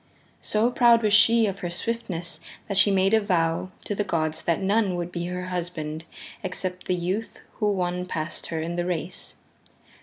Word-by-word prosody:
So 220 +3 +2
proud 235 -2 +5
was 210 -1 +3
she 225 +1 +6
of 195 -1 -2
her 175 - -3
swiftness 175 -3 -2 0.3
that 200 - -2
she 205 - +6
made 195 +1 +3
a 220 - +5
vow 170 -3 +1 0.2
to - - -1
the 205 - 0
gods 155 -5 -1
that 170 +1 +2
none 200 -1 +2
would 175 0 -3
be 170 0 -3
her 180 0 -4
husband 165 -3 -4 0.4
except 185 -1 -4
the 180 - +2
youth 185 +6 -3 0.2
who 210 -1 +2
won 180 -1 -1
past 155 -2 -3
her 165 - -3
in 170 +2 -3
the 175 - 0
race. 180 0 -4
180 Hz, 185 wpm, -25 LUFS, 170-205 Hz, 0.4 s, she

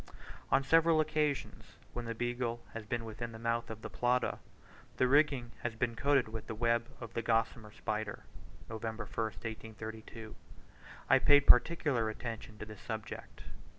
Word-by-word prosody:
On 135 - +4
several 165 +2 +5
occasions, 150 -2 -1 0.2
when 120 -1 -4
the 115 0 -3
Beagle 120 0 -2
has 115 -1 -6
been 120 -1 -2
within 115 +1 -5
the - - -7
mouth 115 +1 -1
of 110 0 -7
the 110 - -4
Plata, 125 +3 +1 0.6
the 130 - +4
rigging 140 -3 +3
has 120 -2 -2
been 115 0 -1
coated 140 +1 +3
with 110 0 -6
the 110 - -4
web 115 +1 +2
of 115 -2 -8
the 115 - -1
Gossamer 115 -1 0
Spider. 105 0 -3 0.4
One 110 -1 -6
day 115 - -3
(November 110 0 -4
1st, 110 +3 -4 0.3
1832) 110 0 -8 0.7
I 135 - +6
paid 145 +1 +6
particular 125 -4 +5
attention 110 -1 -6
to - - -6
this 105 -1 -11
subject. 110 -1 -6
115 Hz, 165 wpm, -33 LUFS, 110-125 Hz, 0.7 s, I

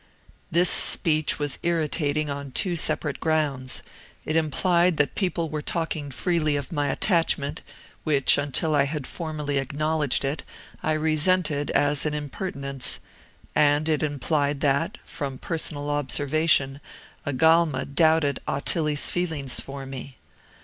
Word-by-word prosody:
"This 175 +1 +4
speech 155 -3 +5
was 145 -2 -2
irritating 155 -2 0
on 140 -1 -5
two 180 -3 0
separate 150 -2 0
grounds. 145 -5 -1 0.4
It 155 - -2
implied 170 +2 +2
that 145 - +1
people 180 -4 -1
were 155 0 -4
talking 160 -2 -3
freely 155 +2 0
of 145 +4 -4
my 145 -3 -1
attachment, 160 -2 +1 0.4
which, 145 -4 +4
until 145 +3 0
I 140 -2 +3
had 145 -1 -3
formally 150 -4 -3
acknowledged 150 0 0
it, 140 +1 -2 0.4
I 155 - 0
resented 155 -1 +1
as 145 +1 +1
an 150 - -2
impertinence; 140 -3 -3 0.5
and 145 +1 +3
it 155 -2 +1
implied 145 0 -1
that, 140 -1 0
from 135 -2 -5
personal 145 -2 -3
observation, 145 0 +1 0.4
Agalma 155 0 +2
doubted 155 0 +2
Ottilie's 150 +1 +1
feelings 160 -7 -1
for 135 0 -6
me. 135 -1 -8
150 Hz, 125 wpm, -24 LUFS, 140-160 Hz, 0.5 s, speech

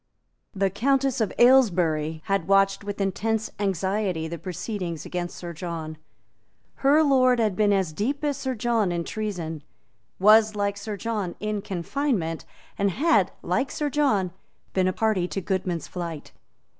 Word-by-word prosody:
The 195 0 +1
Countess 270 +4 +1
of 215 - 0
Aylesbury 170 -11 +3
had 195 -4 0
watched 195 0 +3
with 205 0 -5
intense 220 +3 -1
anxiety 190 -3 -1
the 170 0 -6
proceedings 175 -1 -5
against 175 -1 -4
Sir 175 -1 -6
John. 165 -2 -5 0.8
Her 290 +3 +4
lord 255 -3 +4
had 215 -5 +1
been 210 +1 +3
as 190 -5 +1
deep 270 - -2
as 290 -1 +1
Sir 265 -1 -3
John 225 -4 +1
in 170 -1 -1
treason, 175 -7 -4 0.6
was, 215 +2 +6
like 200 -1 0
Sir 205 0 -5
John, 210 -5 -3
in 210 -1 -2
confinement, 195 - -2 0.3
and 200 0 +3
had, 215 - +2
like 185 +10 0
Sir 295 -1 -2
John, 240 -12 +1 0.4
been 185 -1 +2
a - - +2
party 215 -5 +1
to 195 - -3
Goodman's 185 -2 -2
flight. 170 -4 -6
200 Hz, 150 wpm, -25 LUFS, 175-225 Hz, 0.8 s, was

